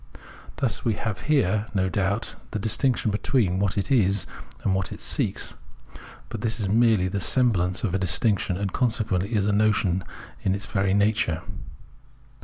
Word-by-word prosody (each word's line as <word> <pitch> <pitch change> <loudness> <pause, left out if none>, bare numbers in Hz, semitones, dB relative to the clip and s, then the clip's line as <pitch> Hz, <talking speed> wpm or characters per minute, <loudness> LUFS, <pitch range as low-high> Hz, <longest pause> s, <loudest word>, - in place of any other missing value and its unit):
Thus 125 -1 -2
we 115 -3 +1
have 110 -1 -3
here, 110 -7 +2
no 95 -1 +2
doubt, 100 +4 -1
the - - -3
distinction 110 +2 +1
between 100 -2 +1
what 100 -1 0
it 100 +7 -1
is 100 -6 +3 0.4
and 95 - +2
what 95 0 -1
it - - -7
seeks; - - -1 0.8
but 110 - -6
this 115 0 -2
is 105 - -1
merely 110 -2 +3
the 100 +2 -2
semblance 95 -4 +2
of 100 -6 -1
a 95 - +1
distinction, 95 +1 +1
and 100 -1 -3
consequently 105 -6 0
it 110 - +1
is 100 - +1
a 105 - +2
notion 100 -3 +2 0.4
in 95 - +1
its 100 0 -5
very 95 -1 0
nature. 100 -5 +1
100 Hz, 170 wpm, -25 LUFS, 95-110 Hz, 0.8 s, is